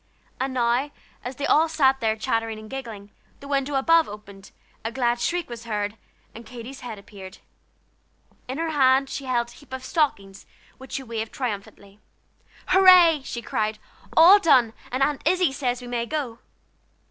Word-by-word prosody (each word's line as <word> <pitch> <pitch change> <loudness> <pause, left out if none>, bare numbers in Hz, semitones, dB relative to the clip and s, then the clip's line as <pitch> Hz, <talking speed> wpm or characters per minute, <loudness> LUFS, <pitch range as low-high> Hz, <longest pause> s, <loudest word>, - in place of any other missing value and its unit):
And 265 +1 -1
now, 245 +3 +1 0.3
as 250 +2 -6
they 285 - -3
all 320 +2 +3
sat 270 -4 +3
there 220 -3 0
chattering 225 0 -2
and 215 0 -11
giggling, 225 -7 -8 0.3
the 280 - -11
window 280 0 -1
above 325 +4 +3
opened, 200 -2 -12 0.3
a 225 - -3
glad 240 -1 0
shriek 345 +5 -1
was 235 -1 -9
heard, 210 -2 -3 0.4
and 230 - -10
Katy's 250 +2 -10
head 235 -4 -7
appeared. 195 -1 -12 1.1
In 260 +2 -5
her 325 0 -2
hand 270 -2 +3
she 275 - -5
held 240 -2 0
a - - -14
heap 285 +1 -18
of 260 0 -6
stockings, 200 - -2 0.3
which 265 - -12
she 270 - -3
waved 225 -2 -5
triumphantly. 205 -4 -6 0.7
"Hurray!" 365 -5 +7
she 235 -3 -6
cried, 215 -1 -2 0.4
"all 360 +6 +9
done, 260 - +4 0.2
and 255 +2 +1
Aunt 290 0 0
Izzie 360 -2 +2
says 250 -2 -2
we 245 - -9
may 235 -1 -2
go. 265 -6 -4
250 Hz, 170 wpm, -24 LUFS, 225-280 Hz, 1.1 s, all